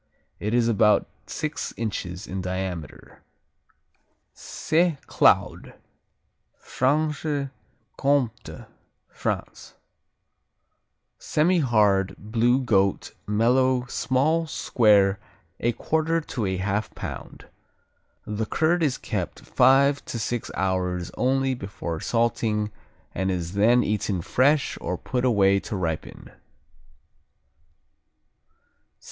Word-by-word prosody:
It 105 +3 -1
is 120 -1 +3
about 110 -2 +3 0.2
six 155 +1 -4
inches 100 -4 -4
in 95 -2 -4
diameter. 90 -3 -6 1.1
Saint 165 -2 -1
Claude - - +2 0.8
Franche 145 +1 -1 0.5
Comté, 140 -4 -1 0.4
France - - -5 1.4
Semihard; 110 - +2
blue; 120 +5 +1
goat; 100 -5 +1
mellow; 125 +4 +2
small; 155 +7 0
square; 105 -8 +3 0.4
a 120 - +1
quarter 160 +4 0
to 120 -9 -4
a 95 0 -1
half 100 +3 -1
pound. - - -8 0.8
The 105 +1 -3
curd 170 +6 +1
is 145 -5 +1
kept - - -4
five 140 +2 +3
to - - -5
six 115 +1 -3
hours 90 -2 -1
only 135 +1 +1
before 95 -8 -5
salting 110 -2 0 0.4
and 95 +1 -1
is 90 -2 -3
then 115 +5 +4
eaten 100 -4 -1
fresh 140 - +2
or 90 +1 -3
put 125 +5 -3
away 100 -5 +4
to 105 - -6
ripen. 85 -4 -4
115 Hz, 95 wpm, -25 LUFS, 95-135 Hz, 1.4 s, then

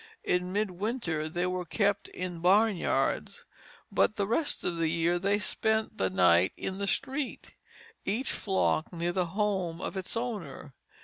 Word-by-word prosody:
In 180 0 0
midwinter 190 -5 -1
they 175 +3 -1
were 180 0 -1
kept 205 +3 0
in 180 -2 -5
barnyards, 195 +2 +2 0.5
but 215 - +3
the 200 - 0
rest 260 +9 -1
of 175 - -1
the 165 -1 +1
year 170 +2 +1
they 200 +2 +2
spent 220 +2 0
the 95 - +2
night 90 -1 +4
in 190 0 -4
the 200 - -1
street, 270 +5 -2 0.5
each 230 +7 -1
flock 190 -5 0
near 170 0 -1
the 180 -1 0
home 190 -6 0
of - - -4
its 190 +4 -3
owner. 200 - -5
185 Hz, 150 wpm, -30 LUFS, 170-210 Hz, 0.5 s, night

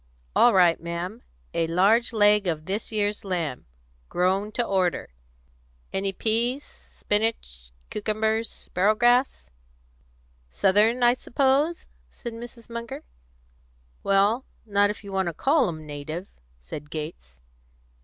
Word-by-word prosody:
"All 240 - +6
right, 180 -5 +4
ma'am; 170 +7 -5 0.3
a 165 - +1
large 200 +9 +3
leg 210 -2 +4
of 155 -2 -2
this 200 +6 -3
year's 205 -1 0
lamb 170 -9 -3 0.4
grown 190 +4 +1
to 240 - 0
order. 185 - 0 0.8
Any 195 0 0
peas, 235 +7 0
spinnage, 205 - -3 0.2
cucumbers, 220 +1 0
sparrowgrass?" 215 - +1 1.0
"Southern, 210 - +3
I 240 0 +6
suppose?" 275 +6 +1 0.2
said 235 - -8
Mrs. 235 0 -10
Munger. 235 0 -6 1.0
"Well, 200 +6 +3 0.2
not 205 -1 +3
if 210 - -5
you 200 - -8
want 190 -1 0
to 170 - -2
call 280 - +3
'em 155 -2 -7
native," 150 +5 -6 0.3
said 140 - -9
Gates. 150 - -7
205 Hz, 115 wpm, -25 LUFS, 175-230 Hz, 1.0 s, All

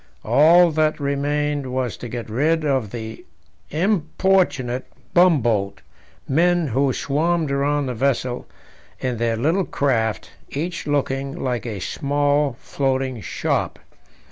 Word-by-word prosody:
All 170 +3 +6
that 155 0 +1
remained 145 -1 -1
was 125 -3 -2
to 120 - -7
get 120 0 -5
rid 155 +8 +1
of 135 -7 0
the 110 0 -7 0.5
importunate 165 - +1 0.3
bumboat 120 - +3 0.5
men 170 +2 +2
who 135 +3 +2
swarmed 155 +3 0
round 140 0 +1
the 125 - -2
vessel 125 0 -1 0.5
in 125 -2 -2
their 115 0 0
little 165 - +1
craft, 115 -6 -1 0.2
each 170 +4 -4
looking 135 -1 -1
like 125 -2 -2
a 105 -4 -4
small 145 +3 0
floating 130 -3 -1
shop. - - -2
140 Hz, 115 wpm, -22 LUFS, 125-155 Hz, 0.5 s, All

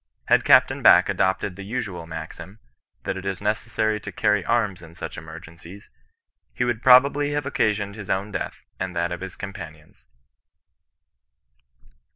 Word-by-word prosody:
Had - - +5
Capt. - - +6
Back - - +6
adopted 95 0 0
the 100 - -9
usual 100 -6 -5
maxim, 85 +4 -8 0.5
that 95 - -3
it 95 - -7
is 95 -2 -3
necessary 110 0 -1
to - - -8
cany 105 -2 +1
arms 105 -6 0
in 85 -1 -14
such - - -7
emergencies, 85 +4 -11 0.6
he - - 0
would 120 -2 -1
probably 140 +3 +5
have 145 -1 -2
occasioned 105 -6 0
his 105 -2 -9
own 100 +2 -1
death - - -5 0.2
and 95 -1 -4
that 85 +1 -1
of 90 - -5
his 95 -1 -7
companions." 80 -7 -10
100 Hz, 150 wpm, -24 LUFS, 85-110 Hz, 0.6 s, Capt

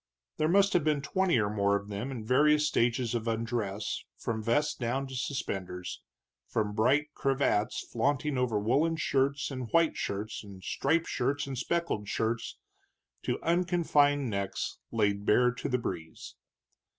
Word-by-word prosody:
There 155 - +2
must 200 +4 +4
have 175 -4 +3
been 150 -2 +1
twenty 190 0 +2
or 105 -2 +2
more 100 -1 +2
of 100 0 -3
them, 105 +6 -4
in 120 -5 -6
various 150 +5 +4
stages 120 -1 +1
of 115 -1 -2
undress 110 -3 -2
from 110 -1 -3
vest 135 +8 +1
down 130 +3 -1
to 130 -1 -8
suspenders, 95 -9 -4 0.5
from 105 -2 -1
bright 140 +8 +2
cravats 135 -6 +1
flaunting 140 +4 0
over 125 -4 +1
woolen 140 +11 +2
shirts 140 -2 0
and 130 -3 -5
white 165 +3 +3
shirts, 105 +3 -4
and 100 -2 -12
striped 160 - +1
shirts 145 +4 -1
and 135 -1 -5
speckled 170 -6 -1
shirts, 115 +2 -2 0.6
to - - -2
unconfined 165 -5 +2
necks 100 -3 -3
laid 100 -3 +1
bare 125 +4 +4
to 125 - -5
the 125 - +2
breeze. 85 -9 -6
125 Hz, 150 wpm, -30 LUFS, 110-145 Hz, 0.6 s, must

